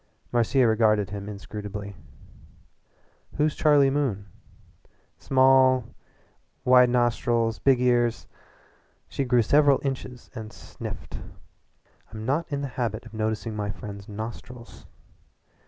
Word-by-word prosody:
Marcia 120 +2 +3
regarded 110 -3 +2
him 100 0 -6
inscrutably. 100 -1 -7 1.4
"Who's 150 0 +1
Charlie 145 -3 +4
Moon?" 130 -9 -1 0.9
"Small 130 -1 +4 0.8
wide 125 -1 +6
nostrils 120 -2 +1
big 135 -2 +3
ears." 120 -2 +1 0.8
She 140 - -3
grew 125 -2 +3
several 145 +3 +4
inches 130 -2 -5
and 110 -3 -8
sniffed. - - -8 0.9
"I'm 110 0 -7
not 150 +6 -1
in 140 0 -2
the 140 - -3
habit 115 -1 -2
of 115 - -13
noticing 110 0 -2
my 105 -1 -3
friends' 100 +1 -8
nostrils. 115 +3 -9
120 Hz, 105 wpm, -25 LUFS, 110-130 Hz, 1.4 s, wide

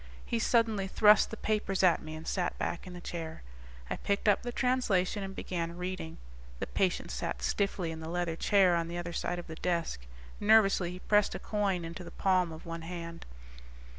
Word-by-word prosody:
He 235 - -1
suddenly 225 -4 +2
thrust 210 +2 +6
the 225 - -6
papers 210 -3 0
at 180 -2 +5
me 155 0 -7
and 160 +1 -8
sat 180 -2 -1
back 170 - -3
in 180 - -8
the 175 - -8
chair. 165 - -6 0.4
I - - -3
picked 200 +1 -1
up 205 -1 +5
the 245 - -4
translation 240 -7 +1
and 195 0 -5
began 170 -1 -3
reading. 180 -2 -4 0.4
The - - -3
patient - - 0
sat - - -3
stiffly 185 - 0
in 160 - -6
the 160 0 -6
leather 175 -1 -1
chair 190 0 +4
on 165 -1 0
the 170 +1 -5
other 170 0 -4
side 175 +1 -2
of 175 - -6
the 160 -1 -8
desk. 165 - -2 0.3
Nervously 205 -4 +5
he 180 +1 -7
pressed 210 -1 +3
a - - -4
coin 195 -5 -1
into 170 +2 -7
the - - -8
palm 185 -3 +2
of 160 +2 -10
one 165 0 -5
hand. 170 0 -7
180 Hz, 200 wpm, -31 LUFS, 170-200 Hz, 0.4 s, thrust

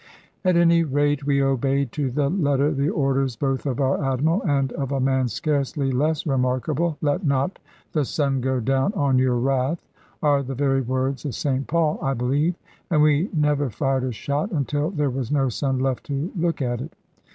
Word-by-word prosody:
At 185 -2 +3
any 170 -1 +5
rate 145 -1 0
we 140 -1 +3
obeyed 135 0 +1
to 145 -3 -1
the 140 +3 0
letter 145 -4 +1
the 140 0 0
orders 135 - 0
both 135 +3 -1
of 130 0 -2
our 140 +2 +1
Admiral 140 +8 +1
and 140 -6 0
of 140 -1 -3
a 135 - 0
man 130 -1 +2
scarcely 135 +4 -1
less 150 +4 0
remarkable. 135 +4 0
"Let 150 +6 0
not 140 +3 0 0.3
the 150 - +1
sun 135 -1 0
go 130 0 0
down 135 - +1
on 140 -7 +2
your 130 -1 +2
wrath," 135 +5 0 0.4
are 145 -2 +3
the 135 0 -5
very 135 0 +1
words 130 +1 -2
of 145 -5 -4
St 135 -1 -1
Paul, 160 -1 +1
I 135 0 0
believe; 140 +8 +1 0.3
and 155 -4 +3
we 150 +6 +3
never 150 -4 +1
fired 135 +3 -1
a 130 - -1
shot 140 - -2
until 145 -1 -1
there 150 -7 -1
was 130 -1 -3
no 135 -3 +2
sun 135 +2 -1
left 130 -1 -1
to 145 +5 -3
look 170 -4 0
at 120 -1 -2
it. - - -8
140 Hz, 190 wpm, -23 LUFS, 130-150 Hz, 0.4 s, any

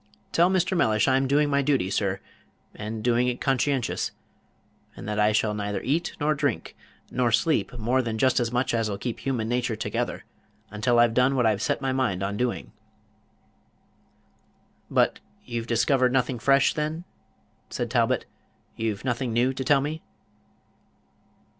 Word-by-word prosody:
Tell 170 +2 +4
Mr. 185 0 +1
Mellish 110 -11 +2
I'm 135 0 +3
doing 145 +2 +3
my 140 -1 +2
duty, 135 -9 +1
sir, 95 -1 -1 0.5
and 110 +1 -6
doing 120 0 +2
it 125 0 -1
conscientious; 135 -1 0 0.9
and - - -9
that 105 0 -2
I 105 0 +4
shall 105 0 +1
neither 105 -1 -3
eat, 160 +6 0
nor 150 +1 +2
drink, 145 -4 -2 0.4
nor 125 -2 +1
sleep 125 +1 +1
more 120 +4 +1
than 115 -3 -3
just 130 +3 +3
as 120 -1 -1
much 125 +1 0
as'll 110 -3 0
keep 120 +2 -4
human 125 -5 -2
nature 120 -1 -1
together, 110 - -3 0.5
until 115 +3 +1
I've 120 -1 +5
done 125 +3 +3
what 125 -3 +2
I've 110 -2 +2
set - - 0
my 135 - +1
mind 100 -8 0
on 100 +1 -2
doing." 125 +2 -2 2.2
"But - - +2 0.3
you've 120 -1 -4
discovered 125 +3 +2
nothing 125 -1 0
fresh, 135 +3 +4
then?" 155 +2 -3 0.7
said - - -3
Talbot; - - +1 0.5
"you've 110 0 -3
nothing 125 -1 -1
new 120 +3 +2
to 130 0 -4
tell 140 +1 +4
me?" 155 +3 -4
125 Hz, 155 wpm, -26 LUFS, 110-135 Hz, 2.2 s, I've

